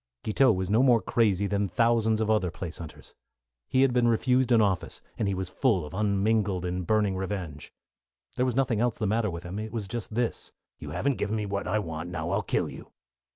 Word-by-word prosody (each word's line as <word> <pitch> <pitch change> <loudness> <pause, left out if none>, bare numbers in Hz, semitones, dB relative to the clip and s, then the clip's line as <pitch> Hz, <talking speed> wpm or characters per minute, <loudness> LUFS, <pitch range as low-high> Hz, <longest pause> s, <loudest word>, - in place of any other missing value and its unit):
Guiteau 130 +4 +4
was 95 -2 -1
no 110 +5 +3
more 125 -3 +5
crazy 100 -4 +1
than 100 0 0
thousands 115 0 +2
of 110 - 0
other 105 -5 +2
place 85 0 -7
hunters. 80 -3 -11 0.5
He 130 0 +3
had 135 -2 +3
been 120 -1 +3
refused 125 +2 +2
an 115 - +6
office, 100 -5 0 0.2
and 105 - -1
he 100 - 0
was 95 0 -3
full 100 - +1
of 75 - -10
unmingled 100 -1 +1
and 90 0 -3
burning 105 -3 +2
revenge. 95 -6 -5 0.6
There 125 - +1
was 125 - -1
nothing 130 -5 +1
else 120 0 +1
the 110 - -2
matter 110 +1 +1
with 85 -1 -6
him. 90 +4 -5
It 110 0 -5
was 110 -4 -4
just 110 0 -5
this: 120 0 -2 0.3
"You 75 - -7
haven't 125 - -1
given 105 +1 -1
me 105 -1 -2
what 100 0 -3
I 105 - +1
want; 80 -4 -4
now 85 -1 -4
I'll 100 +2 +1
kill 100 - -1
you." - - -10
105 Hz, 220 wpm, -27 LUFS, 95-115 Hz, 0.6 s, an